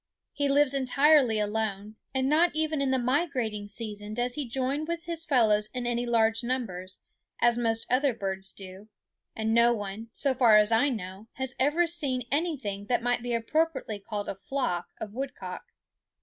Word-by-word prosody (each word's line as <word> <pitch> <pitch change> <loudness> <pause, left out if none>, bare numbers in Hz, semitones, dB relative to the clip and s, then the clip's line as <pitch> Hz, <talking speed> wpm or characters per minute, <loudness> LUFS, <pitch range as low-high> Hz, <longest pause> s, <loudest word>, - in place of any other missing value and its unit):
He 285 -1 0
lives 280 0 +4
entirely 275 -2 +4
alone, 210 0 -2 0.2
and 265 0 0
not 315 +3 +3
even 310 -2 0
in 275 - +1
the 260 - +2
migrating 250 -6 -1
season 210 0 -6
does 245 +1 0
he 285 -1 -3
join 270 +4 -1
with 335 +1 -4
his 335 -2 -4
fellows 215 -7 +3
in 250 -1 -2
any 240 0 -1
large 225 0 +2
numbers, 190 -8 -3 0.4
as 240 0 +4
most 225 -1 0
other 265 +2 +2
birds 195 -3 -4
do; 195 +2 -11 0.5
and 220 0 -1
no 235 +1 +5
one, 205 0 -5
so 275 +2 +1
far 235 -4 +6
as 210 +1 +4
I 230 +6 +4
know, 195 -3 -6
has 265 -1 -3
ever 295 +6 +3
seen 280 -8 -2
anything 270 - -2
that 240 -1 +1
might 245 0 +1
be 240 0 -2
appropriately 265 -2 -1
called 205 0 -5
a - - -2
flock 195 -3 -2
of 210 -2 -6
woodcock. 270 +3 -6
240 Hz, 175 wpm, -28 LUFS, 215-275 Hz, 0.5 s, far